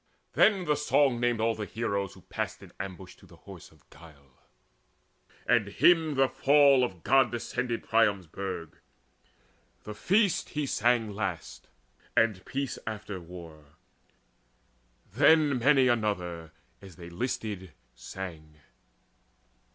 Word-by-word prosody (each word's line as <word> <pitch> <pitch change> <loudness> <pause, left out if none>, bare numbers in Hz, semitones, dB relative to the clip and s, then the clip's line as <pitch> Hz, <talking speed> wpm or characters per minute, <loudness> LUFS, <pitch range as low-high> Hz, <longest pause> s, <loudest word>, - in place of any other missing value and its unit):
Then 195 -4 +3
the 150 - +2
song 145 -3 +2
named 120 -1 0
all 115 0 +1
heroes 100 -2 -3
who 95 - -16
passed - - -5
in - - -13
To - - -9
ambush 95 -1 -9
in - - -17
the - - -17
Horse - - -13
of - - -25
Guile, 70 -4 -18 1.0
and - - +2
hymned 160 -4 +3
The 135 0 +4
fall 140 -1 +4
of 95 -9 -4
god 135 0 +4
descended 120 0 -3
Priam's 105 -5 +2
burg; 90 -1 -7 1.0
The 105 - -7
feast 195 - +1
he 150 - 0
sang 120 -4 +1
last, 100 -5 -5 0.5
and 115 -5 +2
peace 135 -2 -4
after 105 -3 -5
war; 80 -4 -13 1.4
Then 145 +1 +4
many 135 +1 +4
another, 90 -9 -2 0.3
as 95 -3 -13
they 85 -1 -11
listed, 100 -4 -4 0.2
sang. 80 +1 -9
110 Hz, 125 wpm, -28 LUFS, 90-130 Hz, 1.4 s, The